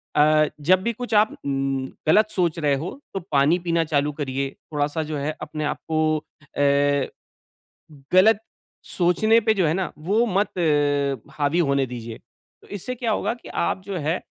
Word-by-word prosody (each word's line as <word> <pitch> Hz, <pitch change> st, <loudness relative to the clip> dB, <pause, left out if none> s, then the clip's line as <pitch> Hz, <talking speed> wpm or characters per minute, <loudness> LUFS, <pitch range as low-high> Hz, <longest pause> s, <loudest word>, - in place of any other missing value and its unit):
अ, 155 Hz, 0 st, +5 dB
जब 185 Hz, +5 st, +4 dB
भी 235 Hz, -, 0 dB
कुछ 245 Hz, 0 st, -6 dB
आप 215 Hz, 0 st, +4 dB
उम, 135 Hz, -1 st, -1 dB, 0.2 s
गलत 215 Hz, +6 st, +5 dB
सोच 170 Hz, -3 st, 0 dB
रहे 145 Hz, -2 st, +2 dB
हो, 170 Hz, -, -5 dB
तो 195 Hz, -, -2 dB
पानी 145 Hz, +5 st, +3 dB
पीना 170 Hz, -1 st, 0 dB
चालू 150 Hz, -1 st, 0 dB
करिए 135 Hz, -1 st, -2 dB, 0.2 s
थोड़ा-सा 150 Hz, +2 st, -1 dB
जो 150 Hz, -1 st, -4 dB
है 150 Hz, +2 st, -3 dB
अपने 155 Hz, -, -5 dB
आपको 155 Hz, +1 st, 0 dB, 0.4 s
अ, 140 Hz, -1 st, +2 dB, 1.1 s
गलत 205 Hz, +3 st, +6 dB, 0.6 s
सोचने 205 Hz, +6 st, +3 dB
पे 220 Hz, 0 st, +2 dB
जो 185 Hz, -4 st, +2 dB
है 155 Hz, -, +1 dB
ना, 190 Hz, -1 st, -2 dB
वो 205 Hz, +9 st, +1 dB
मत 200 Hz, -1 st, 0 dB, 0.9 s
हावी 145 Hz, +3 st, +1 dB
होने 140 Hz, -4 st, +2 dB
दीजिए। 115 Hz, -2 st, -7 dB, 0.4 s
तो -, -, -18 dB
इससे 205 Hz, +6 st, -5 dB
क्या 235 Hz, -2 st, -2 dB
होगा -, -, 0 dB
कि 240 Hz, -, -14 dB
आप 190 Hz, -, -1 dB
जो 195 Hz, -1 st, -5 dB
है, 160 Hz, +4 st, -1 dB
155 Hz, 165 wpm, -23 LUFS, 145-190 Hz, 1.1 s, गलत